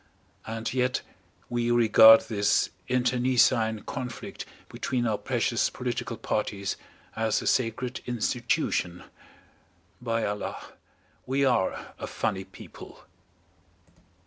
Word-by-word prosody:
And 115 Hz, +1 st, -4 dB
yet 125 Hz, 0 st, 0 dB, 0.4 s
we 120 Hz, 0 st, -1 dB
regard 110 Hz, -1 st, +8 dB
this 105 Hz, -2 st, +1 dB, 0.2 s
internecine 125 Hz, -3 st, +2 dB
conflict 125 Hz, -3 st, -6 dB, 0.2 s
between 125 Hz, -2 st, -2 dB
our 110 Hz, -3 st, 0 dB
precious 120 Hz, -2 st, 0 dB
political 120 Hz, -2 st, -4 dB
parties 100 Hz, -2 st, -2 dB, 0.4 s
as 110 Hz, -1 st, +1 dB
a -, -, -7 dB
sacred 125 Hz, +1 st, 0 dB
institution. 115 Hz, -7 st, -1 dB, 1.0 s
By 115 Hz, -2 st, -1 dB
Allah, 105 Hz, 0 st, -4 dB, 0.7 s
we 135 Hz, +2 st, +1 dB
are 120 Hz, -8 st, 0 dB
a -, -, -5 dB
funny 95 Hz, 0 st, -2 dB
people! 95 Hz, -, -13 dB
115 Hz, 95 wpm, -27 LUFS, 110-125 Hz, 1.0 s, regard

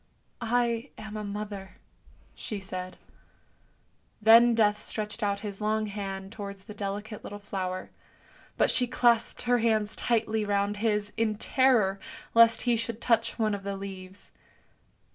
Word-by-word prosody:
" -, -, -42 dB, 0.2 s
I 235 Hz, +2 st, -2 dB
am 215 Hz, 0 st, -8 dB
a 215 Hz, -, -4 dB
mother," 205 Hz, -1 st, -6 dB, 0.6 s
she 210 Hz, -, -5 dB
said. 185 Hz, -1 st, -6 dB, 1.2 s
Then 230 Hz, +2 st, +7 dB
Death 210 Hz, -2 st, +3 dB
stretched 210 Hz, +1 st, -3 dB
out 200 Hz, -1 st, 0 dB
his 205 Hz, -1 st, -6 dB
long 215 Hz, +1 st, +1 dB
hand 195 Hz, -2 st, -5 dB
towards 200 Hz, -3 st, -7 dB
the 210 Hz, -, -10 dB
delicate 205 Hz, +1 st, -5 dB
little 205 Hz, -, -7 dB
flower, 185 Hz, -2 st, -4 dB, 0.7 s
but -, -, +3 dB
she 250 Hz, -1 st, +1 dB
elapsed 235 Hz, -2 st, +2 dB
her 245 Hz, 0 st, +3 dB
hands 220 Hz, -2 st, +1 dB
tightly 220 Hz, -2 st, 0 dB
round 205 Hz, 0 st, 0 dB
his, 210 Hz, -1 st, 0 dB
in 220 Hz, -1 st, +1 dB
terror 220 Hz, -5 st, +2 dB, 0.3 s
lest 230 Hz, 0 st, +6 dB
he 240 Hz, -1 st, +3 dB
should 230 Hz, 0 st, -2 dB
touch 230 Hz, -2 st, +1 dB
one 215 Hz, -2 st, +1 dB
of 200 Hz, -, -3 dB
the 200 Hz, 0 st, -4 dB
leaves. 190 Hz, 0 st, -9 dB
210 Hz, 145 wpm, -28 LUFS, 200-225 Hz, 1.2 s, Then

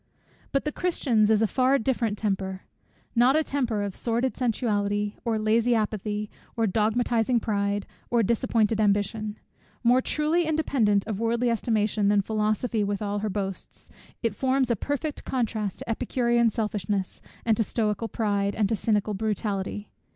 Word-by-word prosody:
But 275 Hz, -, 0 dB
the 300 Hz, -, 0 dB
Christian's 250 Hz, -13 st, +1 dB
is 220 Hz, 0 st, +4 dB
a -, -, +5 dB
far 260 Hz, +5 st, +3 dB
different 230 Hz, -4 st, 0 dB
temper: 190 Hz, -2 st, -2 dB, 0.5 s
not 245 Hz, +4 st, +5 dB
a 315 Hz, -, +3 dB
temper 240 Hz, -8 st, -1 dB
of 200 Hz, -2 st, -4 dB
sordid 240 Hz, +2 st, -1 dB
sensuality, 210 Hz, -4 st, 0 dB
or 230 Hz, -2 st, 0 dB
lazy 225 Hz, +3 st, +2 dB
apathy, 210 Hz, -1 st, -1 dB, 0.3 s
or 225 Hz, -, +2 dB
dogmatizing 225 Hz, +3 st, +1 dB
pride, 200 Hz, -2 st, -1 dB, 0.2 s
or 235 Hz, -1 st, +3 dB
disappointed 220 Hz, 0 st, +1 dB
ambition: 210 Hz, +1 st, 0 dB, 0.5 s
more 245 Hz, +2 st, +5 dB
truly 310 Hz, +5 st, +1 dB
independent 255 Hz, -10 st, +2 dB
of 210 Hz, -3 st, -3 dB
worldly 235 Hz, +1 st, +1 dB
estimation 215 Hz, -2 st, +1 dB
than 205 Hz, 0 st, +4 dB
philosophy 215 Hz, +1 st, 0 dB
with 205 Hz, +1 st, -2 dB
all 205 Hz, 0 st, -1 dB
her 215 Hz, +1 st, -2 dB
boasts, 195 Hz, -1 st, -5 dB, 0.3 s
it 230 Hz, -3 st, +1 dB
forms 260 Hz, +1 st, +1 dB
a -, -, +3 dB
perfect 285 Hz, -, -3 dB
contrast 220 Hz, -5 st, -2 dB
to -, -, -8 dB
Epicurean 235 Hz, 0 st, +2 dB
selfishness, 205 Hz, -3 st, -2 dB, 0.2 s
and 225 Hz, -2 st, +4 dB
to 225 Hz, -, +3 dB
Stoical 215 Hz, 0 st, -1 dB
pride, 205 Hz, -3 st, 0 dB
and 210 Hz, -2 st, +2 dB
to 225 Hz, -, +1 dB
Cynical 210 Hz, 0 st, 0 dB
brutality. 205 Hz, -1 st, -2 dB
220 Hz, 150 wpm, -26 LUFS, 205-240 Hz, 0.5 s, a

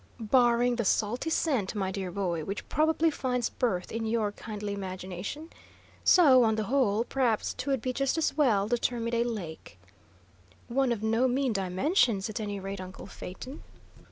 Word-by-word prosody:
"Barring 240 Hz, +1 st, +3 dB
the 235 Hz, -, 0 dB
salty 220 Hz, +8 st, 0 dB
scent, 265 Hz, -, 0 dB
my 190 Hz, -2 st, -1 dB
dear 190 Hz, -1 st, -4 dB
boy, 175 Hz, -3 st, -2 dB
which 195 Hz, +4 st, -5 dB
probably 315 Hz, +1 st, +2 dB
finds 250 Hz, -4 st, -1 dB
birth 185 Hz, -8 st, -1 dB
in 225 Hz, 0 st, -2 dB
your 220 Hz, -2 st, 0 dB
kindly 210 Hz, -1 st, -6 dB
imagination. 190 Hz, -, -6 dB, 0.5 s
So, 275 Hz, -9 st, +7 dB
on 220 Hz, -1 st, +2 dB
the 215 Hz, -, -1 dB
whole, 230 Hz, -2 st, +2 dB
perhaps 245 Hz, -4 st, 0 dB
'twould 270 Hz, -5 st, -2 dB
be 255 Hz, -, -1 dB
just 275 Hz, +3 st, 0 dB
as 320 Hz, -, 0 dB
well 225 Hz, -10 st, +3 dB
to 240 Hz, 0 st, +1 dB
term 235 Hz, -1 st, -1 dB
it -, -, -6 dB
a 235 Hz, 0 st, +2 dB
lake." 185 Hz, -, -6 dB, 0.9 s
"One 260 Hz, +1 st, +1 dB
of 220 Hz, -3 st, -2 dB
no 225 Hz, +4 st, +2 dB
mean 255 Hz, -1 st, +1 dB
dimensions, 200 Hz, -, +1 dB
at 230 Hz, -, -4 dB
any 205 Hz, -2 st, -3 dB
rate, 195 Hz, 0 st, -5 dB
uncle 185 Hz, +1 st, -9 dB
Phaeton." 200 Hz, +8 st, -9 dB
230 Hz, 170 wpm, -29 LUFS, 200-255 Hz, 0.9 s, So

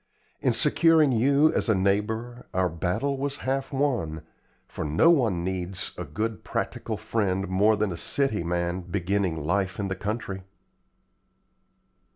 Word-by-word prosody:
In -, -, +2 dB
securing 160 Hz, -4 st, +4 dB
you 140 Hz, +6 st, +4 dB
as -, -, 0 dB
a 110 Hz, -, +4 dB
neighbor 110 Hz, +5 st, -1 dB
our 95 Hz, -1 st, +2 dB
battle 95 Hz, -, -1 dB
was 140 Hz, +1 st, -2 dB
half 135 Hz, +2 st, -1 dB
won, 120 Hz, -, -1 dB, 0.4 s
for -, -, -5 dB
no 80 Hz, -, +4 dB
one 115 Hz, -, +2 dB
needs 90 Hz, 0 st, -3 dB
a -, -, -5 dB
good 110 Hz, +10 st, -3 dB
practical -, -, -3 dB
friend 95 Hz, -3 st, -1 dB
more 100 Hz, +4 st, +3 dB
than 105 Hz, -2 st, 0 dB
a 85 Hz, -, -5 dB
city 135 Hz, -2 st, 0 dB
man 85 Hz, +1 st, -1 dB
beginning 90 Hz, 0 st, -1 dB
life 95 Hz, +5 st, -1 dB
in 100 Hz, -1 st, -2 dB
the 95 Hz, -, -2 dB
country." 100 Hz, -1 st, -4 dB
100 Hz, 145 wpm, -26 LUFS, 90-125 Hz, 0.4 s, securing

